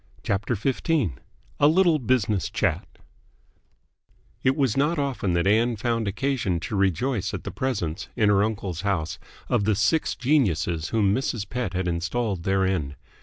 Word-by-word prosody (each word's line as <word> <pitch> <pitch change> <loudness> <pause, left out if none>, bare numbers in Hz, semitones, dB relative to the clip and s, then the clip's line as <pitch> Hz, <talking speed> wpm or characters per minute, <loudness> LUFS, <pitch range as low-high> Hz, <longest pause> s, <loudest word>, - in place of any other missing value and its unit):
CHAPTER 105 +3 -1
XV 125 +5 -1 0.8
A 145 - +6
LITTLE 165 0 +4
BUSINESS 115 - +1
CHAT - - -1 1.5
It 130 +1 +2
was 135 -7 +1
not 150 +5 +1
often 135 -10 -1
that 85 +1 +1
Ann 115 +4 +3
found 115 0 -1
occasion 115 -5 -1
to 105 - -4
rejoice 100 - 0
at - - -7
the - - -5
presence 100 -10 -3
in 105 -2 +3
her 100 -1 +4
uncle's 100 -6 -3
house 95 -6 -2 0.3
of 100 - +1
the 110 -1 +2
six 160 - +1
geniuses 90 - +1
whom 105 -3 +2
Mrs. 115 -4 -2
Pett 125 -5 -3
had 90 0 -1
installed 90 +2 -2
therein. 95 -7 0
105 Hz, 150 wpm, -25 LUFS, 95-130 Hz, 1.5 s, A